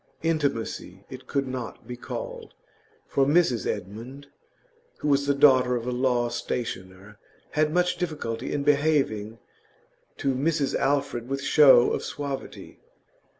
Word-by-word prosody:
Intimacy 135 - -2
it 130 0 -10
could 140 -1 -1
not 130 -3 -6
be 125 - -5
called, - - -7 0.5
for 140 - +1
Mrs 140 - +2
Edmund 125 +9 -6 0.7
(who - - -4
was 140 -1 +2
the 140 - +2
daughter 130 -3 +5
of 120 -1 -3
a 125 - -2
law 125 -1 +1
stationer) 105 -4 -5 0.3
had 155 0 +1
much 180 +1 +1
difficulty 150 -10 -4
in 145 - -1
behaving 140 -7 +1 0.8
to 135 - 0
Mrs 145 +1 0
Alfred 135 -3 0
with 135 0 -3
show 140 -5 +6
of - - -2
suavity. 140 -2 -6
135 Hz, 130 wpm, -26 LUFS, 120-145 Hz, 0.8 s, show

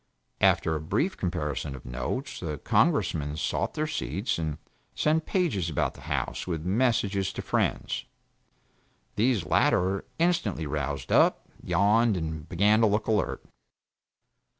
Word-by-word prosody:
After 80 - +3
a 80 - -2
brief 105 - 0
comparison 75 -6 -3
of 65 - -12
notes, 120 - -4
the 75 -4 -4
Congressmen 75 +1 +1
sought - - -1
their 155 - 0
seats 125 - -2
and 80 -2 -2 0.4
sent 155 +1 +1
pages 145 - 0
about 75 - 0
the - - -14
House - - -2
with 80 -3 -3
messages 100 -2 +1
to - - -5
friends. - - -1 1.1
These 115 -3 +2
latter 95 +2 +2
instantly 165 - +1
roused 70 -2 -3
up, - - +4
yawned, 100 +5 +3
and 80 -2 -5
began 105 +5 +3
to 110 - +5
look 105 +1 +1
alert. 105 -4 0
95 Hz, 130 wpm, -27 LUFS, 80-115 Hz, 1.1 s, to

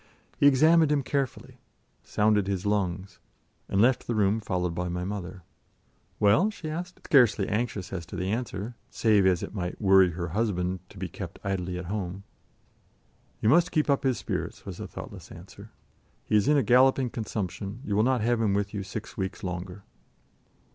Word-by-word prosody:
He 145 - +6
examined 155 +3 +5
him 145 -2 +2
carefully, 135 -1 -3 0.4
sounded 105 -2 +2
his 100 0 -2
lungs, 95 -2 -1 0.5
and 95 - +1
left 125 +4 +3
the 120 - -1
room 105 +1 +2
followed 90 -4 -2
by 90 +1 -3
my 90 +1 -3
mother. 95 -2 -6 0.8
"Well?" 105 - +4
she 175 -8 -6
asked, 175 +3 -6
scarcely 120 -8 +4
anxious 105 -4 -2
as 85 -3 -5
to 95 - -8
the 90 0 -2
answer, 110 -1 -3 0.2
save 105 -4 +3
as 90 -2 +2
it - - -6
might 90 -3 -4
worry 95 -3 +5
her 85 0 -4
husband 95 -2 -1
to - - -15
be - - -4
kept - - -8
idly 90 -2 -2
at 90 - -6
home. 95 0 -4 1.2
"You 110 - +3
must 175 +6 +4
keep 155 -3 +2
up 140 - +2
his 130 -3 +1
spirits," - - -4
was - - -7
the - - -6
thoughtless - - -10
answer. - - -12 0.6
"He - - 0
is 105 -1 +3
in 150 - +4
a 140 - +3
galloping 130 +2 +4
consumption; 105 0 -4
you 100 - -1
will 105 - +4
not 125 +1 +2
have 120 +1 +1
him 105 -3 +2
with 100 0 -1
you 100 - -3
six 100 +3 -7
weeks 95 +1 -4
longer." 90 +1 -5
105 Hz, 180 wpm, -27 LUFS, 95-125 Hz, 1.2 s, He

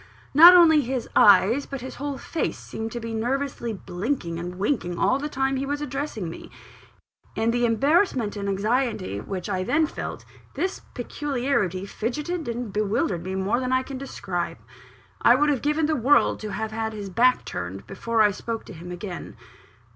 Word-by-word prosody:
Not 340 +5 +10
only 320 -4 +7
his 255 -2 -3
eyes, 225 +6 +5
but 275 -2 -6
his 260 - -7
whole 280 0 -4
face, 330 - -3
seemed 225 0 -6
to 240 - -3
be 230 0 -5
nervously 245 +1 -2
blinking 185 -2 -3
and 175 +1 -5
winking 190 -3 -1
all 260 - +2
the 295 +1 -3
time 270 -1 0
he 270 - -2
was 290 +1 -2
addressing 275 - -4
me, 165 - -9 0.9
In 225 +1 +1
the 240 0 +2
embarrassment 265 - +2
and 200 -1 -3
anxiety 210 - -1
which 185 -3 -5
I 190 -3 -1
then 310 +10 +2
felt, - - -6 0.3
this 375 +1 -2
peculiarity 245 - -1
fidgetted 300 - -3
and 235 -3 -4
bewildered 200 -4 0
me 190 +1 -4
more 195 +5 0
than 255 0 -2
I 260 0 +2
can 265 -1 -7
describe. 190 -10 -4 0.6
I 240 - +6
would 295 +3 +3
have 270 - -1
given 300 +2 +1
the 310 0 +1
world 280 +3 +3
to 215 -1 -5
have 220 +3 -3
had 220 0 -3
his 205 -2 -6
back 250 +6 +3
turned, 95 +3 -5
before 230 -1 0
I 210 - +4
spoke 225 +3 -5
to - - -10
him 175 +1 -9
again. 180 0 -7
235 Hz, 180 wpm, -25 LUFS, 200-275 Hz, 0.9 s, Not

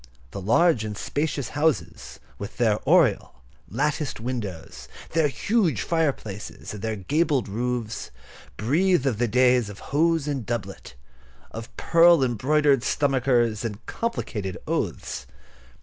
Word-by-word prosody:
The 100 - -6
large 120 - +3
and 105 -1 -5
spacious 145 -3 -2
houses, 150 +1 -1 0.2
with 100 - -7
their 110 -4 +2
oriel, 60 - +3 0.3
latticed 145 - -1
windows, 95 - -5 0.2
their 160 -2 +3
huge 170 - 0
fireplaces, 140 - -3
and 105 - -7
their 110 0 -2
gabled 140 - 0
roofs, 115 +1 -3 0.5
breathe 155 - +2
of 120 -6 0
the 120 - +2
days 125 -1 +3
of 100 - -9 0.2
hose 160 0 +2
and 140 -4 -2
doublet, 115 - -5 0.6
of 115 +1 -9
pearl 170 -3 +5
embroidered 135 +3 +2
stomachers, 125 -5 +1
and 110 -1 -5
complicated 105 - -3
oaths. - - -3
125 Hz, 120 wpm, -25 LUFS, 110-150 Hz, 0.6 s, pearl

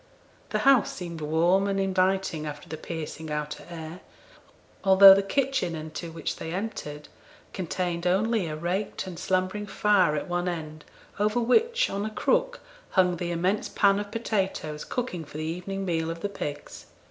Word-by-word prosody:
The - - 0
house 270 -5 +5
seemed 170 -3 -7
warm 170 +6 +2
and 195 0 0
inviting 190 -4 +1
after 150 +3 -7
the 160 - -5
piercing 160 0 -6
outer 150 0 -4
air, 165 0 -7 0.8
although 195 0 +10
the 195 - +3
kitchen 260 -4 0
into 160 +2 -6
which 165 - -4
they 160 - -6
entered 150 -8 -5 0.5
contained 175 -1 -2
only 205 +1 +2
a 155 - -4
raked 180 +7 -2
and 180 -3 -7
slumbering 185 +3 -1
fire 200 -6 +3
at 150 - -3
one 175 0 -1
end, 155 -3 -6 0.3
over 210 +3 +2
which, 460 - +3
on 200 +1 -2
a 215 - -2
crook, - - 0 0.3
hung 180 -2 +3
the 175 0 -3
immense 180 +4 0
pan 200 -1 +3
of 205 0 -5
potatoes 190 -9 -2
cooking 235 -10 -3
for 150 - -10
the 155 - -3
evening 180 +4 -4
meal 165 -2 -1
of 165 0 -5
the 205 - -2
pigs. 145 -7 -6
180 Hz, 165 wpm, -27 LUFS, 160-200 Hz, 0.8 s, although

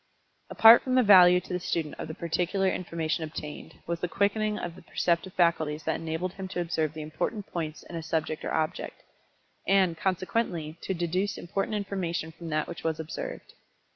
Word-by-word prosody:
Apart 225 +1 +8
from 255 -1 -1
the 255 - +5
value 180 -4 +8
to 180 - -8
the 180 - 0
student 165 -4 -2
of - - -4
the 155 - -6
particular 180 +3 0
information 165 -3 -2
obtained, 150 -1 -7
was 170 0 -2
the 180 - -1
quickening 210 +3 0
of 175 - -5
the 185 - -13
perceptive 170 +2 0
faculties 160 -3 +1
that 160 +1 0
enabled 165 +3 -3
him 190 -1 -6
to 185 - -4
observe 160 -3 -1
the 155 - -5
important 175 +7 -3
points 155 -3 -5
in 175 - -10
a 165 - -3
subject 160 -1 -2
or - - -3
object, 155 -1 -2 0.6
and, 190 -3 +4
consequently 185 -4 -1
to 190 - -2
deduce 180 +4 -1
important 195 +4 -2
information 180 -5 -3
from 165 0 -9
that 155 0 0
which 170 - -8
was 160 -1 -1
observed. 160 0 -6
170 Hz, 185 wpm, -28 LUFS, 160-190 Hz, 0.6 s, Apart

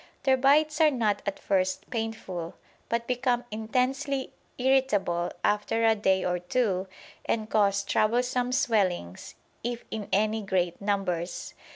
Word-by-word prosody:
Their 265 -1 +4
bites 300 +4 +3
are 310 - +7
not 220 -7 0
at 200 - -1
first 185 -1 0
painful, 220 -7 -4 0.3
but 235 0 -1
become 245 0 0
intensely 260 +5 -1 0.2
irritable 245 -10 +1
after 210 +2 +1
a 225 - +6
day 190 -3 +1
or 180 0 0
two 190 -1 0 0.4
and 220 -2 -1
cause 200 -2 +2
troublesome 245 +4 +1
swellings, 195 - 0 0.3
if 240 0 -4
in 215 -2 -5
any 215 +2 +2
great 185 -3 -1
numbers. 185 -4 -2
220 Hz, 130 wpm, -27 LUFS, 190-250 Hz, 0.4 s, are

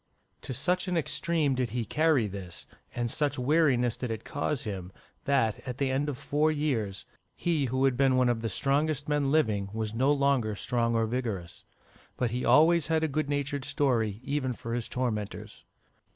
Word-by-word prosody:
To - - -6
such 180 +9 0
an 180 -1 0
extreme 160 -2 0
did 125 -2 -1
he 120 +1 -2
carry 155 -2 +2
this, 95 -3 -6 0.3
and 120 -1 -1
such 145 -1 0
weariness 130 -3 +2
did 125 - -4
it 110 -1 -4
cause 145 -1 -2
him, 95 -3 -5 0.3
that, 130 -7 +2
at 125 -1 -4
the 135 -1 0
end 140 +3 0
of 140 - -4
four 150 +3 +1
years, 125 -11 -1 0.3
he 160 -5 0
who 130 +2 +1
had 135 -2 +3
been 135 -1 +4
one 125 -1 +4
of 120 -2 +1
the 115 - -2
strongest 145 +6 0
men 145 -2 +1
living, 105 -10 +1
was 110 -1 -3
no 130 +5 +2
longer 140 -7 +2
strong 115 +2 0
or 115 0 +2
vigorous. 110 -8 -4 0.5
But 125 -3 0
he 125 +2 -2
always 160 +5 +5
had 160 -1 +1
a - - +3
good 155 0 -2
natured 145 -1 -1
story, 115 -7 0
even 135 -2 -1
for 115 0 -6
his 120 -1 -2
tormentors. 110 -5 -4
130 Hz, 185 wpm, -29 LUFS, 115-145 Hz, 0.5 s, always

